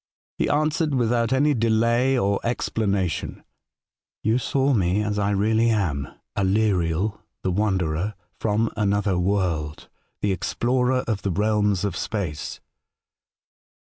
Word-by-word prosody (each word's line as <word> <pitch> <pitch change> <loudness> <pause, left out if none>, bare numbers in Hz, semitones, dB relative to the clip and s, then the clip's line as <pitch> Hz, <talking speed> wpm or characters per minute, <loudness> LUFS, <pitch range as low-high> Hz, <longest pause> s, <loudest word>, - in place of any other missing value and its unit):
He - - +1
answered, 155 0 +1
with 120 -2 +2
out 115 0 +1
any 145 +3 +3
delay 115 +2 +2
or 100 -4 +1
explanation: 100 -7 -1 0.4
' - - -71
You 110 +4 +2
saw 135 +2 +1
me 95 -1 +1
as 105 0 -1
I 100 0 +1
really 110 +3 +2
am, 80 - 0 0.3
Aleriel, 95 -1 +1 0.2
the 95 - 0
wanderer, 95 -1 0 0.2
from 110 +1 +1
another 100 -3 +1
world, 90 -5 -1 0.3
the 105 - +1
explorer 125 +7 0
of 110 -4 -1
the 100 - -1
realms 105 0 +1
of 100 -4 -2
space.' 90 -9 -4
105 Hz, 125 wpm, -24 LUFS, 95-115 Hz, 0.4 s, any